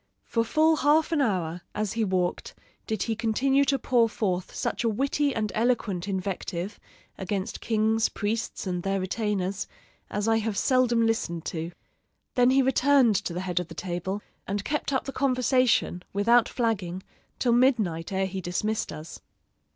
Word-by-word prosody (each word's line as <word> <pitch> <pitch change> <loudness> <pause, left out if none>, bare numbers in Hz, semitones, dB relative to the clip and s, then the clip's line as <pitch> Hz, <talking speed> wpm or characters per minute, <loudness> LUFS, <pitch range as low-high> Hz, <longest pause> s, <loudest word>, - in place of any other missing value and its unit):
For 230 - 0
full 315 +6 +3
half 305 +3 +3
an 315 -3 +2
hour, 180 -8 -1
as 210 -2 -1
he 230 - 0
walked, 185 -3 -1 0.3
did 220 - -1
he 225 - -1
continue 265 +5 +2
to 275 0 +2
pour 240 -2 +2
forth 185 -5 -2
such - - -2
a 230 - +2
witty 275 +5 +1
and 215 -2 -1
eloquent 215 -6 0
invective 190 0 -3 0.4
against 195 +2 -3
kings, 220 0 +2
priests, 220 +1 -3
and 180 -2 -2
their 195 +1 -1
retainers, 195 0 -2 0.4
as 205 +1 -2
I 225 0 +4
have 220 -2 -2
seldom 240 -2 +3
listened 170 -7 -1
to. 165 0 -4 0.6
Then 245 0 +4
he 265 +1 +4
returned 265 -3 +4
to - - -3
the 175 +2 -3
head 180 -2 -1
of 180 - -4
the - - -11
table 190 +3 -4 0.2
and 200 +1 -2
kept 300 -1 -1
up 265 - 0
the 270 - -4
conversation, 255 -7 +2
without 230 +4 +4
flagging, 190 -7 -2 0.3
till 240 -2 +2
midnight 220 -11 +2
ere 190 0 +1
he 190 0 -4
dismissed 210 +5 -2
us. 155 +2 -9
215 Hz, 165 wpm, -27 LUFS, 185-245 Hz, 0.6 s, I